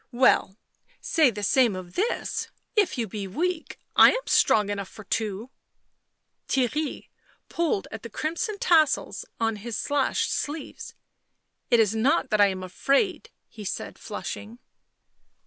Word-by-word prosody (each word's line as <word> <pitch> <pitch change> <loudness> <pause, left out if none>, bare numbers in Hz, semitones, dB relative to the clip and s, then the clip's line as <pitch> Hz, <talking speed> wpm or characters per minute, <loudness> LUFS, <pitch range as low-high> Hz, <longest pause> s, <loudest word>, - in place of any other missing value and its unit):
" - - -48
Well, 195 -4 +3 0.4
say 315 -5 +3
the 210 -3 -6
same 240 -1 +3
of 180 -1 -8
this; 435 - -1 0.3
if 415 -9 +2
you 230 -2 -1
be 200 0 -5
weak, 335 - -3 0.2
I - - +9
am - - -3
strong 210 -2 +3
enough 200 -2 -4
for 215 - -12
two." 215 +3 -3 1.0
Theirry 275 +4 -1 0.4
pulled 330 - -1
at 220 - -7
the 235 - -8
crimson 335 - -3
tassels 315 -7 +2
on 225 -1 0
his 220 +1 -5
slashed 285 -2 0
sleeves. 295 +1 -5 0.4
" - - -52
It 235 - +5
is 220 -2 +3
not 255 +3 +2
that 215 -1 +3
I 205 - +7
am 190 -1 -3
afraid," 275 - 0 0.2
he 215 -2 -11
said, 195 - -5
flushing. 220 +3 -6
230 Hz, 145 wpm, -26 LUFS, 205-305 Hz, 1.0 s, I